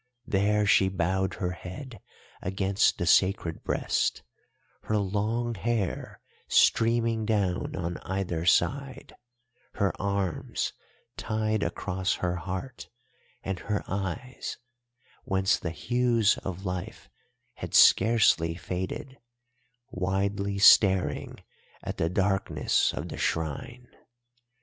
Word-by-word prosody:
There 105 +2 +2
she 95 -1 +4
bowed 95 +1 -1
her 90 -2 -2
head 110 +8 -9 0.4
against 95 +2 +1
the 85 - -2
sacred 95 -3 +2
breast, - - -1 0.6
her 110 - +1
long 105 +4 -1
hair 110 -2 -3 0.3
streaming 115 -1 +3
down 100 -5 -1
on 85 -1 -3
either 95 -4 -3
side, 135 +7 +1 0.6
her 100 -1 +1
arms 100 -3 -2 0.4
tied 110 -1 -1
across 95 -1 -1
her 90 0 -2
heart, 95 +9 -6 0.5
and 95 -2 -3
her 105 +1 -2
eyes, 100 +7 -4 0.7
whence 95 +1 +1
the 85 - -3
hues 120 +4 +1
of 95 +1 -6
life 90 -1 -5 0.5
had - - -5
scarcely 95 -8 +5
faded, 95 +9 -5 0.7
widely 100 +2 -1
staring 95 -2 +4 0.4
at - - -5
the 80 - 0
darkness 95 +1 +1
of - - -6
the - - -7
shrine. 125 +10 -3
100 Hz, 100 wpm, -27 LUFS, 90-110 Hz, 0.7 s, scarcely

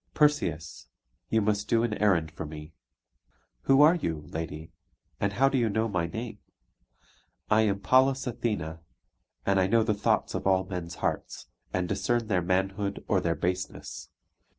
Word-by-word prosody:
"Perseus, 90 - +1 0.4
you 110 -1 +2
must 105 0 0
do 115 -1 +2
an 120 -3 0
errand 90 -7 +2
for - - -6
me." 75 +1 -9 0.9
"Who 135 +2 +6
are 155 +3 +7
you, 85 - -2
lady? 80 0 -6 0.5
And 100 0 0
how 135 +6 +4
do 135 -1 +1
you 115 -2 +2
know 110 +2 0
my 90 -5 -1
name?" 110 +2 -6 1.1
"I 110 +1 +5
am 100 0 -2
Pallas 130 +3 +3
Athene; 105 - -3 0.7
and 100 -1 +3
I 95 - +3
know 115 +3 +3
the 110 -1 +1
thoughts 100 - 0
of - - -2
all 95 -1 +3
men's 90 -3 -5
hearts, - - -3 0.2
and 90 -1 -1
discern 110 +5 0
their 95 -4 +2
manhood 95 +3 -1
or 95 -3 +2
their 85 -1 0
baseness. 90 +1 -4
100 Hz, 160 wpm, -28 LUFS, 85-115 Hz, 1.1 s, are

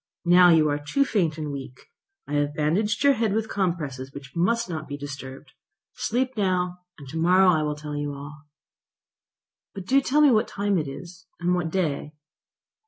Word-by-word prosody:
Now 180 +1 +7
you 160 -2 +5
are 145 0 -1
too 275 - 0
faint 170 - 0
and 150 -2 -4
weak. 135 -2 -8 0.5
I - - -6
have 145 0 0
bandaged 195 - 0
your 280 0 +6
head 225 -5 0
with 220 +1 -1
compresses 150 -10 -3
which 140 +1 -11
must 230 +7 +1
not 160 -4 -5
be 145 0 -5
disturbed. 135 -1 -8 0.4
Sleep 255 +3 -1
now, 180 -3 0 0.2
and 140 -4 -12
to 160 - -6
morrow 180 +3 +5
I 160 -3 +1
will 150 -1 -1
tell 150 0 -7
you 145 -1 -3
all." 150 +2 -11 1.3
"But 195 -2 -7
do 270 +6 +3
tell 290 +3 +2
me 295 -2 +6
what 220 0 +3
time 200 -2 0
it 150 - -3
is, 170 +5 -10
and 175 +1 +1
what 175 -2 -1
day." 155 -4 -2
170 Hz, 185 wpm, -25 LUFS, 145-195 Hz, 1.3 s, Now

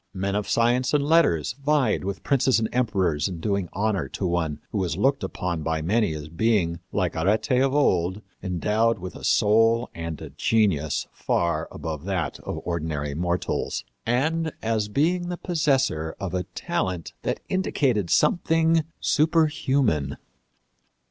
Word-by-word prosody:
Men 95 +1 -1
of 105 0 -2
science 125 +4 +2
and 145 - +2
letters 145 - +3
vied 140 -9 +2
with 100 +1 -4
princes 135 -2 +3
and 110 -1 0
emperors 95 -11 +1
in 90 -3 -6
doing 100 0 -1
honor 105 0 -1
to 95 - -4
one 80 -4 -1
who 105 - -1
was 90 -3 -1
looked 135 +1 +2
upon 85 -3 -3
by 80 0 -1
many 105 -1 +1
as 75 -1 -7
being, 85 -1 +1
like 95 -3 -1
Arete 100 - +1
of 135 +1 +2
old, 95 -7 +2 0.2
endowed 105 +5 +1
with 90 -1 -7
a - - -10
soul 115 +3 +3
and 85 -1 -5
a - - -8
genius 90 -10 +1
far 85 -2 0
above 80 -1 -5
that 95 -4 -2
of - - -5
ordinary 80 -4 -2
mortals, 85 -3 -2 0.2
and 155 +7 0
as 110 -2 0
being 175 +10 +1
the 175 - -3
possessor 135 - 0
of 95 -3 -4
a 90 -1 -1
talent 90 -3 -2
that - - -2
indicated 130 - 0
something 165 -4 +3 0.2
superhuman. 140 - +1
105 Hz, 150 wpm, -25 LUFS, 85-135 Hz, 0.2 s, letters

